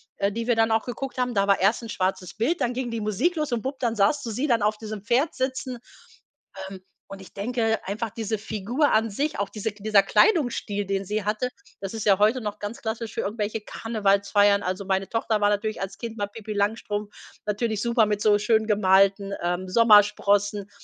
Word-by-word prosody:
äh, 200 Hz, +1 st, 0 dB
die 230 Hz, +2 st, -4 dB
wir 240 Hz, -, +3 dB
dann 225 Hz, 0 st, +2 dB
auch 225 Hz, 0 st, +1 dB
geguckt 260 Hz, +2 st, -5 dB
haben, 250 Hz, -1 st, 0 dB
da 200 Hz, -2 st, +2 dB
war 200 Hz, 0 st, +3 dB
erst 205 Hz, +5 st, +2 dB
'n 230 Hz, -, -7 dB
schwarzes 185 Hz, -2 st, -2 dB
Bild, 275 Hz, +11 st, 0 dB
dann 240 Hz, -, +1 dB
ging 250 Hz, -1 st, -3 dB
die 230 Hz, -1 st, -4 dB
Musik 215 Hz, -, 0 dB
los 305 Hz, -3 st, -2 dB
und 235 Hz, -2 st, 0 dB
bupp, 265 Hz, +2 st, -5 dB
dann 230 Hz, -3 st, -1 dB
sahst 205 Hz, +9 st, +2 dB
du 230 Hz, -, -4 dB
sie 255 Hz, +7 st, -1 dB
dann 235 Hz, -5 st, +2 dB
auf 210 Hz, +1 st, +1 dB
diesem 215 Hz, -1 st, -7 dB
Pferd 255 Hz, +8 st, +1 dB
sitzen, 260 Hz, -1 st, -3 dB, 0.9 s
ähm, 190 Hz, -1 st, -10 dB, 0.3 s
und 195 Hz, 0 st, -9 dB
ich 190 Hz, -, -14 dB
denke 225 Hz, +1 st, -1 dB
einfach 220 Hz, +4 st, -3 dB
diese 220 Hz, -1 st, -3 dB
Figur 220 Hz, +7 st, -1 dB
an 220 Hz, +1 st, +2 dB
sich, 290 Hz, +9 st, -2 dB
auch 200 Hz, -, -1 dB
diese 215 Hz, +1 st, -4 dB
K 205 Hz, 0 st, -17 dB
dieser 210 Hz, -2 st, +5 dB
Kleidungsstil, 245 Hz, -, +2 dB
den 195 Hz, 0 st, -2 dB
sie 210 Hz, +2 st, -2 dB
hatte, 215 Hz, +4 st, -1 dB, 0.3 s
das 195 Hz, +1 st, -5 dB
ist 220 Hz, -2 st, -4 dB
ja 195 Hz, -3 st, +5 dB
heute 220 Hz, +5 st, +3 dB
noch 210 Hz, -2 st, -4 dB
ganz 205 Hz, +3 st, -6 dB
klassisch 220 Hz, 0 st, -4 dB
für -, -, -2 dB
irgendwelche 215 Hz, +1 st, -3 dB
Karnevalsfeiern. 205 Hz, -2 st, +1 dB
Also, 185 Hz, +2 st, -3 dB
meine 190 Hz, 0 st, 0 dB
Tochter 225 Hz, -1 st, 0 dB
war 205 Hz, -, +4 dB
natürlich 215 Hz, +1 st, -1 dB
als 195 Hz, 0 st, -5 dB
Kind 230 Hz, -1 st, -6 dB
mal 205 Hz, -, -1 dB
Pipi 215 Hz, +1 st, -7 dB
Langstrumpf 205 Hz, 0 st, -2 dB, 0.3 s
natürlich 210 Hz, 0 st, -1 dB
super 235 Hz, -2 st, +3 dB
mit 210 Hz, 0 st, -1 dB
so 205 Hz, -1 st, +4 dB
schön 220 Hz, +1 st, +2 dB
gemalten, 195 Hz, -1 st, +3 dB
ähm, 175 Hz, +2 st, -1 dB
Sommersprossen. 205 Hz, -1 st, +4 dB
215 Hz, 215 wpm, -25 LUFS, 200-230 Hz, 0.9 s, dieser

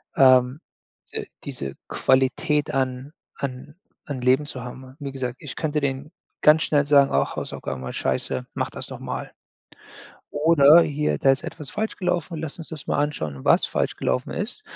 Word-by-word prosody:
ähm, 130 Hz, +1 st, +5 dB, 0.5 s
de -, -, -4 dB, 0.2 s
diese 70 Hz, 0 st, -5 dB
Qualität 145 Hz, +3 st, +1 dB
an 130 Hz, +2 st, -2 dB, 0.2 s
an 140 Hz, +2 st, -6 dB, 0.3 s
an 135 Hz, -4 st, -5 dB
Leben 130 Hz, +4 st, +3 dB
zu 125 Hz, -5 st, -6 dB
haben. 130 Hz, +1 st, -10 dB
Wie 140 Hz, -1 st, -5 dB
gesagt, 130 Hz, -2 st, -4 dB
ich 145 Hz, -4 st, -8 dB
könnte 155 Hz, -2 st, -1 dB
denen 140 Hz, +2 st, -2 dB, 0.3 s
ganz 155 Hz, +2 st, +6 dB
schnell 145 Hz, -2 st, +2 dB
sagen: 140 Hz, -1 st, +5 dB
„Ach, -, -, +1 dB
Hausaufgaben 65 Hz, -1 st, -5 dB
waren 65 Hz, -, -5 dB
scheiße, 65 Hz, -1 st, -2 dB
mach -, -, -1 dB
das -, -, -8 dB
noch -, -, -8 dB
mal." -, -, -5 dB, 1.0 s
Oder: 155 Hz, +1 st, +6 dB
„Hier, 150 Hz, 0 st, -1 dB
da 135 Hz, -, +4 dB
ist 135 Hz, -, -2 dB
etwas 150 Hz, -4 st, -6 dB
falsch 220 Hz, +1 st, -3 dB
gelaufen, 175 Hz, -3 st, -1 dB
lass 160 Hz, +2 st, -5 dB
uns 165 Hz, -, -7 dB
das 155 Hz, -3 st, -7 dB
mal -, -, 0 dB
anschauen, 80 Hz, -, -4 dB
was -, -, +5 dB
falsch -, -, -1 dB
gelaufen 125 Hz, -, -1 dB
ist. 245 Hz, -, -4 dB
140 Hz, 170 wpm, -24 LUFS, 130-150 Hz, 1.0 s, ganz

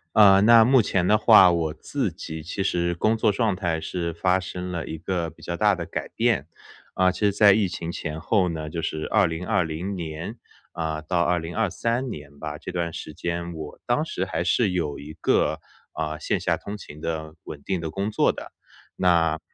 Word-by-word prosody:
啊， 100 Hz, -2 st, +7 dB
那 115 Hz, +1 st, +7 dB
目 130 Hz, 0 st, +5 dB
前 95 Hz, -3 st, 0 dB
的 105 Hz, -, +5 dB
话， 105 Hz, -5 st, +7 dB
我 80 Hz, -2 st, -1 dB
自 105 Hz, -, -3 dB
己 80 Hz, -3 st, -7 dB
其 95 Hz, +4 st, -3 dB
实 85 Hz, -2 st, 0 dB
工 110 Hz, +6 st, +2 dB
作 110 Hz, -1 st, +2 dB
状 105 Hz, -2 st, +1 dB
态， 85 Hz, -4 st, -1 dB
是 85 Hz, +1 st, -3 dB
发 90 Hz, +3 st, +1 dB
生 90 Hz, 0 st, -6 dB
了 85 Hz, -3 st, -4 dB
一 80 Hz, -, -6 dB
个 85 Hz, 0 st, -2 dB
比 80 Hz, -, -19 dB
较 85 Hz, -, -4 dB
大 105 Hz, +3 st, +3 dB
的 90 Hz, -3 st, -4 dB
改 -, -, -5 dB
变。 115 Hz, -, 0 dB, 0.5 s
啊， 95 Hz, 0 st, +4 dB
其 90 Hz, -, -9 dB
实 105 Hz, -1 st, +4 dB
在 100 Hz, 0 st, +6 dB
疫 100 Hz, -2 st, +2 dB
情 85 Hz, -, -5 dB
前 80 Hz, 0 st, -5 dB
后 95 Hz, +1 st, +1 dB
呢， 80 Hz, -2 st, -4 dB
就 85 Hz, +2 st, -4 dB
是 80 Hz, -1 st, -3 dB
2020 90 Hz, -1 st, 0 dB
年， 85 Hz, +4 st, -5 dB, 0.4 s
啊， 80 Hz, -2 st, -3 dB
到 85 Hz, +3 st, 0 dB
2023 105 Hz, +9 st, -1 dB
年 70 Hz, -7 st, -9 dB
吧， 75 Hz, -1 st, -5 dB
这 85 Hz, -, -8 dB
段 85 Hz, -2 st, -1 dB
时 80 Hz, -, -7 dB
间， 85 Hz, +2 st, -4 dB
我 80 Hz, -2 st, -8 dB
当 -, -, +1 dB
时 -, -, -3 dB
还 85 Hz, -, -2 dB
是 95 Hz, +3 st, +2 dB
有 80 Hz, -6 st, -2 dB
一 75 Hz, +2 st, -9 dB
个， -, -, +1 dB, 0.4 s
呃， 75 Hz, -1 st, -3 dB
线 -, -, -1 dB
下 -, -, +1 dB
通 100 Hz, -, -7 dB
勤 75 Hz, -7 st, -11 dB
的、 80 Hz, -1 st, -4 dB
稳 70 Hz, -2 st, -9 dB
定 95 Hz, -2 st, -1 dB
的 80 Hz, -1 st, -4 dB
工 100 Hz, +6 st, -3 dB
作 -, -, +2 dB
的。 -, -, -9 dB, 0.5 s
那 85 Hz, -3 st, +3 dB
85 Hz, 210 characters per minute, -24 LUFS, 80-100 Hz, 0.5 s, 啊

